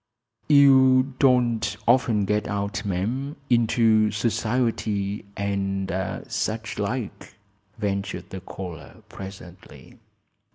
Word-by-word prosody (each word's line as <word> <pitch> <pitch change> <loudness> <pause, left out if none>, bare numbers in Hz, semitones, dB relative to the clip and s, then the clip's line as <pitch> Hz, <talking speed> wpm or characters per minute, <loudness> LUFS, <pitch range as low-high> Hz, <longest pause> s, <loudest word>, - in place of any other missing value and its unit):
"You 135 -2 +6
don't 120 -6 +2
often 120 -4 +3
get 105 +2 0
out, 100 0 -3
ma'am; 115 - -2 0.2
into 115 -2 +4
society, 110 -2 -1
and 95 -1 -2 0.4
such 110 0 -3
like," 105 +2 -4 0.4
ventured 100 -3 -3
the 95 - -6
caller, 90 -3 -9
presently. 95 -2 -11
105 Hz, 85 wpm, -24 LUFS, 100-120 Hz, 0.4 s, You